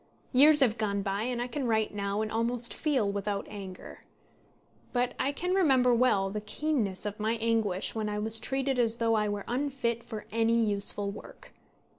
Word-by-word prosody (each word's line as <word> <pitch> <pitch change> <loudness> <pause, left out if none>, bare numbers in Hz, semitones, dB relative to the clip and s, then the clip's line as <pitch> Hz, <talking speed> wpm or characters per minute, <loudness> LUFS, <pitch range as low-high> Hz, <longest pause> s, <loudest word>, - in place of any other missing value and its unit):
Years 295 +3 +7
have 235 -4 +2
gone 200 -2 -1
by, 200 0 -2
and 250 -1 -2
I 240 - -1
can 265 0 -3
write 220 -2 +1
now, 200 +1 -2
and 215 - -4
almost 235 +1 -1
feel, 260 -10 0
without 200 0 -3
anger; 195 -3 -9 0.9
but 245 0 0
I 275 - +1
can 360 +5 -2
remember 265 -10 +4
well 210 -6 +2
the 210 +1 -4
keenness 215 -4 -2
of 210 0 -4
my 215 +2 0
anguish 220 -4 0
when 215 -1 -2
I 210 - -3
was 220 +1 +2
treated 270 0 -1
as 230 -2 +3
though 230 -1 +1
I 210 -1 +1
were 205 -1 -3
unfit 245 -3 -2
for 220 -3 -7
any 230 +1 +2
useful 205 -2 +1
work. - - -12
225 Hz, 185 wpm, -29 LUFS, 205-250 Hz, 0.9 s, Years